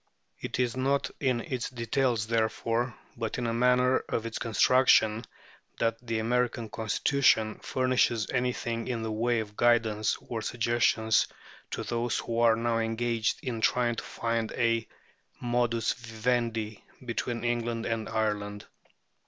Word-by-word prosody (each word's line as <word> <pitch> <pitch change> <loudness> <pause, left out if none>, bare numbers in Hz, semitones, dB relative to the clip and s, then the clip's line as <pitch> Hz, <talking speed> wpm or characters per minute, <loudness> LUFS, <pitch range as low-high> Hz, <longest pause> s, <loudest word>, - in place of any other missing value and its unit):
It - - -4
is 125 -1 +1
not 135 +2 0
in 130 -4 +1
its 125 0 -3
details, 120 -1 0
therefore, 115 +1 0 0.2
but 115 -2 -3
in 125 - -2
the 115 -1 0
manner 125 +2 +3
of 115 - -1
its 115 - -4
construction, 115 -1 +4 0.5
that 115 0 0
the 115 -2 -2
American 120 0 0
Constitution 110 0 +2
furnishes 130 -4 +1
anything 120 -2 -1
in 120 -3 -2
the 110 - -3
way 115 +1 +1
of 105 -1 -9
guidance 110 -3 +2
or 115 -2 -5
suggestion 115 -1 +1 0.6
to - - -4
those 120 0 -1
who 115 0 -2
are 115 -1 +5
now 115 0 0
engaged 115 0 -1
in 120 -4 -3
trying 120 +1 +2
to 115 - -5
find 115 -1 -2
a 115 -1 +1 0.5
modus 120 -2 +1
vivendi 115 -2 -2 0.2
between 115 0 -3
England 120 -1 -1
and 115 -1 -2
Ireland. 105 -2 -2
115 Hz, 135 wpm, -29 LUFS, 110-120 Hz, 0.6 s, are